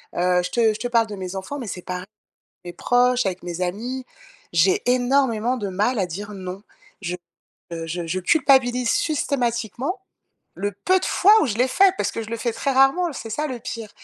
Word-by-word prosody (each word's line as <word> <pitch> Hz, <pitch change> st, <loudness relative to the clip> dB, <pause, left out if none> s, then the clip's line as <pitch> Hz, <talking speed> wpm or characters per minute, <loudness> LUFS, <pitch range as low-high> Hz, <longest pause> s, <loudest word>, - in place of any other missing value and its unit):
Heu, 180 Hz, 0 st, +2 dB
je 180 Hz, -, -3 dB
te 225 Hz, -1 st, +3 dB
je 215 Hz, -, -8 dB
te 245 Hz, -, -2 dB
parle 230 Hz, -2 st, +2 dB
de 210 Hz, -, -6 dB
mes 185 Hz, 0 st, -6 dB
enfants 195 Hz, +10 st, -5 dB
mais 240 Hz, -, -6 dB
c'est 180 Hz, -2 st, -5 dB
par 180 Hz, 0 st, -5 dB, 0.6 s
mes 175 Hz, -, -5 dB
proches, 245 Hz, +5 st, +2 dB
avec 185 Hz, -2 st, -3 dB
mes 175 Hz, 0 st, -5 dB
amis. 240 Hz, +8 st, -3 dB, 0.5 s
J'ai 170 Hz, +3 st, +3 dB
énormément 250 Hz, -2 st, +1 dB
de 205 Hz, -4 st, -3 dB
mal 210 Hz, +5 st, 0 dB
à 185 Hz, -, +2 dB
dire: 205 Hz, +5 st, -7 dB
«non». 185 Hz, 0 st, -7 dB, 0.4 s
Je, 180 Hz, -2 st, -3 dB, 0.6 s
heu, 165 Hz, -1 st, -4 dB
je 170 Hz, +1 st, -4 dB
je 185 Hz, +3 st, -1 dB
culpabilise 250 Hz, -, +3 dB
systématiquement, 275 Hz, -, -1 dB, 0.5 s
le 205 Hz, +1 st, -3 dB
peu 375 Hz, 0 st, +4 dB
de -, -, -3 dB
fois 400 Hz, +3 st, +5 dB
où -, -, +2 dB
je 215 Hz, -3 st, -2 dB
l'ai 255 Hz, +1 st, +3 dB
fait 380 Hz, +6 st, +4 dB
parce -, -, 0 dB
que 225 Hz, -, -4 dB
je 220 Hz, -, -9 dB
le 230 Hz, -, -2 dB
fais 235 Hz, 0 st, -1 dB
très 275 Hz, +4 st, -1 dB
rarement, 270 Hz, +7 st, +4 dB
l 300 Hz, -, -7 dB
c'est 225 Hz, -3 st, -7 dB
ça, 300 Hz, +7 st, -1 dB
le 255 Hz, -3 st, -5 dB
pire. 230 Hz, -3 st, -6 dB
230 Hz, 215 wpm, -23 LUFS, 185-260 Hz, 0.6 s, fois